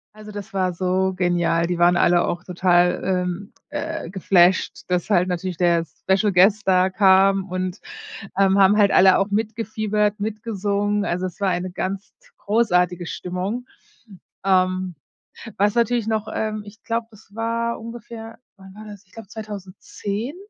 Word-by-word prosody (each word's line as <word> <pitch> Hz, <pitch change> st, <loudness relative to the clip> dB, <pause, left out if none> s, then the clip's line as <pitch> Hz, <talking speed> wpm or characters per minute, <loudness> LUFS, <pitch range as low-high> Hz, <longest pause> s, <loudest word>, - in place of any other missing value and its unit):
Also, 215 Hz, 0 st, -11 dB
das 205 Hz, +1 st, -8 dB
war 185 Hz, -2 st, 0 dB
so 185 Hz, +2 st, 0 dB
genial. 175 Hz, -2 st, +1 dB
Die 175 Hz, 0 st, -2 dB
waren 175 Hz, +1 st, +4 dB
alle 175 Hz, 0 st, +3 dB
auch 175 Hz, +1 st, -3 dB
total, 180 Hz, -1 st, +2 dB
ähm, 180 Hz, +1 st, -2 dB, 0.2 s
äh, 290 Hz, -, -4 dB
geflasht, 185 Hz, -1 st, +2 dB
dass 180 Hz, +2 st, -1 dB
halt 185 Hz, -2 st, +3 dB
natürlich 180 Hz, 0 st, -3 dB
der 170 Hz, -1 st, +2 dB
Special 195 Hz, +5 st, 0 dB
Guest 195 Hz, +3 st, +4 dB
da 185 Hz, 0 st, +4 dB
kam 195 Hz, 0 st, +4 dB
und, 185 Hz, +1 st, -3 dB, 0.6 s
ähm, 195 Hz, 0 st, +4 dB
haben 195 Hz, +2 st, +5 dB
halt 205 Hz, -2 st, +4 dB
alle 190 Hz, 0 st, +6 dB
auch 195 Hz, +1 st, -1 dB
mitgefiebert, 215 Hz, -1 st, -1 dB
mitgesungen. 205 Hz, -1 st, -1 dB
Also 180 Hz, +2 st, -1 dB
es 180 Hz, +2 st, -12 dB
war 200 Hz, -1 st, +1 dB
eine 180 Hz, 0 st, -2 dB
ganz 190 Hz, +2 st, -4 dB
t -, -, -25 dB
großartige 180 Hz, -5 st, +1 dB
Stimmung. 185 Hz, +9 st, -4 dB, 0.8 s
Ähm, 185 Hz, -1 st, +1 dB, 0.6 s
was 205 Hz, +1 st, +2 dB
natürlich 235 Hz, -1 st, +1 dB
noch 220 Hz, -1 st, -1 dB
ähm, 215 Hz, -1 st, -2 dB
ich 210 Hz, +2 st, -14 dB
glaube, 230 Hz, 0 st, -2 dB
das 215 Hz, -1 st, -19 dB
war 230 Hz, +1 st, -2 dB
ungefähr 230 Hz, 0 st, -9 dB, 0.2 s
wann 190 Hz, -1 st, -14 dB
war 215 Hz, +1 st, -11 dB
das, 205 Hz, -1 st, -11 dB
ich 195 Hz, -, -29 dB
glaube, 225 Hz, -2 st, -11 dB
2010? 210 Hz, -, -6 dB
195 Hz, 155 wpm, -22 LUFS, 180-215 Hz, 0.8 s, alle